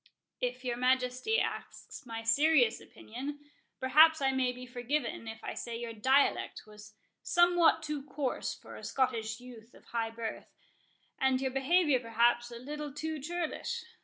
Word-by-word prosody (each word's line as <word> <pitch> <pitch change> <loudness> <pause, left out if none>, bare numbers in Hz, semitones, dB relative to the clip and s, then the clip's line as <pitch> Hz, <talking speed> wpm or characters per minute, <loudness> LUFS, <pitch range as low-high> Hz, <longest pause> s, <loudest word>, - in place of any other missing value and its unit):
"If 250 +1 -3
your 240 -1 -1
Majesty 255 - +1
asks - - -5
my 225 -1 -5
serious 255 +1 +4
opinion, 275 +6 -7 0.4
perhaps 310 +5 +6
I 270 -1 +2
may 260 -1 +1
be 250 0 -9
forgiven 250 0 -3
if 220 0 -8
I - - -4
say 235 -1 -5
your 235 -1 -5
dialect 260 +6 +2
was 210 0 -14 0.3
somewhat 345 -2 +4
too 300 -2 -3
coarse 280 -2 -3
for - - -12
a - - -10
Scottish 240 -5 -1
youth 240 -2 -13
of - - -18
high 230 -1 -2
birth, 225 0 -6 0.7
and 265 -1 +3
your 265 -1 -1
behaviour 280 +1 +3
perhaps 240 +1 +2
a 235 - -8
little 295 +4 -6
too 310 +2 -4
churlish. 340 +3 -3
255 Hz, 155 wpm, -31 LUFS, 235-295 Hz, 0.7 s, perhaps